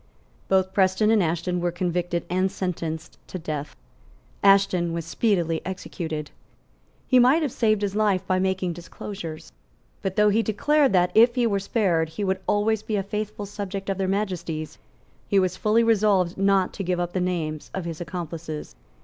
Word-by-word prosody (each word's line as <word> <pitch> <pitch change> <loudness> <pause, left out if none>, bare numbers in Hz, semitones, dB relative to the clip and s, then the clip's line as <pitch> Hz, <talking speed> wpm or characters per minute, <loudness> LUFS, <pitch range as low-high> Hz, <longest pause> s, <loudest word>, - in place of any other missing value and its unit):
Both 190 0 +2
Preston 190 +2 +3
and 220 -2 +4
Ashton 175 +1 -1
were 175 0 0
convicted 175 0 -2
and 185 +2 0
sentenced 165 -4 -4
to - - -6
death. 155 -4 -5 0.7
Ashton 195 -4 +4
was 165 -1 -3
speedily 170 -4 0
executed. 160 -5 -5 0.7
He 255 0 +4
might 265 +7 +5
have 285 - -1
saved 215 -3 +1
his 200 -1 -1
life 205 -3 +2
by 185 0 +1
making 190 -1 0
disclosures. 170 -1 -8 0.5
But 190 -1 -3
though 210 0 +5
he 215 +2 +3
declared 275 +6 +2
that, 180 -1 +3
if 235 +2 +6
he 245 -2 +2
were 200 -3 +1
spared, 185 -6 +1
he 160 +6 -5
would 190 -1 0
always 210 +1 +2
be 215 - -3
a 195 - 0
faithful 210 +1 -4
subject 195 -1 -4
of 195 - -4
Their 190 - 0
Majesties, 180 -6 -3 0.5
he 200 - +2
was 185 -2 +2
fully 215 +4 +2
resolved 205 -5 +3
not 195 -1 +2
to 195 - -4
give 180 -1 -1
up 175 0 -2
the 185 - 0
names 160 -4 -2
of 190 -3 -3
his 165 0 -5
accomplices. 165 - -6
190 Hz, 175 wpm, -24 LUFS, 175-205 Hz, 0.7 s, if